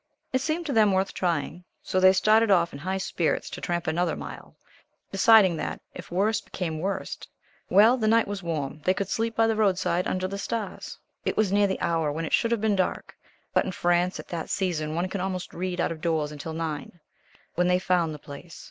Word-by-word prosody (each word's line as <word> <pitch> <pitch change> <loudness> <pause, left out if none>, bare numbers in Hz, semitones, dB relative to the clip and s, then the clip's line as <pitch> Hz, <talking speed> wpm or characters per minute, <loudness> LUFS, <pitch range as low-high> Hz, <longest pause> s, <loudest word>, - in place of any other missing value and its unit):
It 260 - +2
seemed 320 +4 -2
to 285 - -2
them 215 -3 +5
worth 190 +1 0
trying, 175 0 -2 0.2
so 185 - 0
they 185 0 +7
started 215 +3 +4
off 175 -4 +3
in 140 - -7
high 190 +5 -2
spirits 175 -3 -1
to - - -7
tramp 175 0 -2
another 175 +2 0
mile, - - -9 0.6
deciding 195 -3 +6
that, - - -4
if - - -10
worse 210 +5 +1
became 160 -4 -4
worst 195 +4 -4 0.4
well 220 +6 +6
the 220 -3 0
night 225 +1 +4
was 200 -1 -4
warm 155 -4 -4
they 185 - +2
could 195 0 -3
sleep 225 0 -1
by 225 - +4
the 225 0 +1
roadside 185 -4 +1
under 185 0 -1
the 200 +1 -5
stars. 215 -2 -4 0.3
It - - -2
was 215 -3 +2
near 205 0 +4
the 190 - -2
hour 165 -3 +1
when 165 +3 -3
it - - -5
should 230 - +3
have 230 -3 0
been 215 -2 +2
dark 185 -1 -2 0.4
but - - +3
in 185 - -4
France 175 +1 +1
at - - -10
that 165 -2 -4
season 160 -5 -1
one 175 +2 0
can 190 0 -4
almost 185 -1 -4
read 180 0 -3
out - - +1
of 160 -1 -6
doors 160 -3 0
until 150 +2 -6
nine 160 +1 -5 0.5
when 180 +1 +1
they 180 0 +4
found 180 -3 +1
the 150 - -6
place. 145 +4 -11
185 Hz, 220 wpm, -26 LUFS, 165-205 Hz, 0.6 s, they